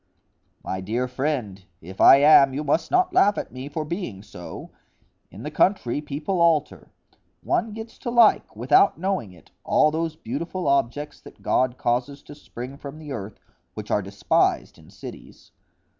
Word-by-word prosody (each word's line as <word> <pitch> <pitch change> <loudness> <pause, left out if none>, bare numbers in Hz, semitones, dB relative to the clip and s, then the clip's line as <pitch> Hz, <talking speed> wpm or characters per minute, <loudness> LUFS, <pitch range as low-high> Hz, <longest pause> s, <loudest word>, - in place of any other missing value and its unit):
"My 95 - -4
dear 115 +7 -2
friend, 125 -8 -3 0.2
if 95 +3 -8
I - - +9
am, 140 -3 +6
you 150 - -2
must 150 +3 0
not 365 0 +2
laugh 205 - +4
at - - -5
me 130 +2 -8
for 155 +1 -4
being 150 - -5
so. 90 -4 -10 0.6
In 100 +6 -11
the 150 - -5
country 150 -7 +1
people 150 +5 -3
alter; 160 -3 +1 0.5
one 225 - 0
gets 225 +1 -9
to - - -5
like, 235 - +4
without 125 - +3
knowing 185 - -2
it, 90 -2 -19
all 155 - +3
those 160 0 -2
beautiful 165 +8 -5
objects 140 +2 -1
that - - -16
God 130 -1 +1
causes 125 +4 -2
to - - -12
spring 135 -2 -9
from 140 +1 -9
the 155 -2 -9
earth, 105 -5 -7 0.4
which - - -7
are 105 - +2
despised 100 +1 0
in - - -18
cities. - - -12
145 Hz, 165 wpm, -24 LUFS, 120-165 Hz, 0.6 s, I